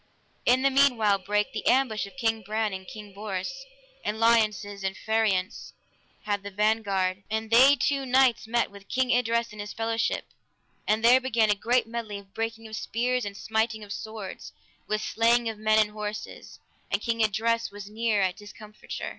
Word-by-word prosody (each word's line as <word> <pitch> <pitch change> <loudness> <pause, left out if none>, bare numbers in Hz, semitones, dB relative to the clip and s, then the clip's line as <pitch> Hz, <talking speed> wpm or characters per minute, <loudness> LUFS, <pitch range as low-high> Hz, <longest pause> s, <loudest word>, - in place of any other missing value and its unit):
In 255 +2 +4
the 275 - +4
meanwhile 240 -7 +4
brake 205 +2 -1
the 215 - -4
ambushment 235 -5 +1
of - - -11
King 225 -2 0
Ban 215 0 -2
and 190 0 -7
King 210 -1 -10
Bors, 195 -2 -4 0.5
and 215 - -3
Lionses 215 -3 +2
and 190 0 -2
Phariance 220 -3 -1 0.5
had 205 -1 -1
the 200 - -7
vanguard, 200 -2 0
and 220 +1 -3
they 265 +5 +7
two 280 0 0
knights 255 -3 +3
met 235 -1 0
with 200 0 -14
King 255 -1 +1
Idres 235 -1 +1
and 210 -1 -7
his 205 0 -7
fellowship, 225 +1 -1 0.6
and 215 +2 +2
there 250 +2 +7
began 225 -4 +2
a - - +5
great 240 +5 +1
medley 225 -2 -5
of 195 -1 -14
breaking 225 +1 -4
of 220 - -7
spears, 245 +2 -1
and 200 -1 -6
smiting 220 0 -1
of 205 -1 -7
swords, 220 -3 -7 0.3
with 215 0 -1
slaying 235 +1 +2
of 220 -2 -4
men 215 0 +3
and 215 -1 +3
horses, 210 0 -7 0.3
and - - 0
King 230 -1 0
Idres 230 +2 +1
was 200 0 -9
near 215 -1 0
at 185 -1 0
discomforture. 210 0 -8
220 Hz, 180 wpm, -27 LUFS, 205-230 Hz, 0.6 s, they